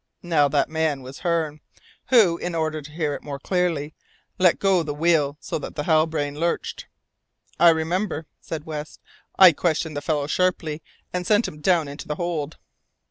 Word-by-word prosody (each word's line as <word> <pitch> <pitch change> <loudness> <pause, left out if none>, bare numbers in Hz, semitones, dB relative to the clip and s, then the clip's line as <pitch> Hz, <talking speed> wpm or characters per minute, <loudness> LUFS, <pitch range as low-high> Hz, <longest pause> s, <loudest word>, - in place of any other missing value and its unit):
Now 160 -5 +3
that 140 0 +1
man 155 -4 -1
was 130 +2 -10
Hearne, 165 -4 -1 0.5
who, 205 -10 +5
in 175 -1 -3
order 155 -1 -1
to 150 +1 -12
hear 155 -2 -2
it - - -6
more 140 -2 -6
clearly, 160 -2 -1 0.5
let 180 -2 +5
go 195 -3 +3
the 150 -3 -4
wheel, 150 -3 +2
so - - -4
that - - -8
the 150 - -2
Halbrane 155 -2 +1
lurched 170 +1 -2 0.4
" - - -56 0.3
"I 170 +1 +8
remember," 165 +1 0
said 160 -2 -6
West. 150 -1 -6 0.4
"I 185 -2 +9
questioned 160 -1 -1
the 145 - -3
fellow 145 -1 -1
sharply, 160 -1 0 0.3
and 180 0 -2
sent 215 +2 +3
him 150 - -10
down 170 -3 +2
into 140 +1 -8
the 150 - -2
hold." 165 -3 -3
160 Hz, 180 wpm, -23 LUFS, 150-175 Hz, 0.5 s, I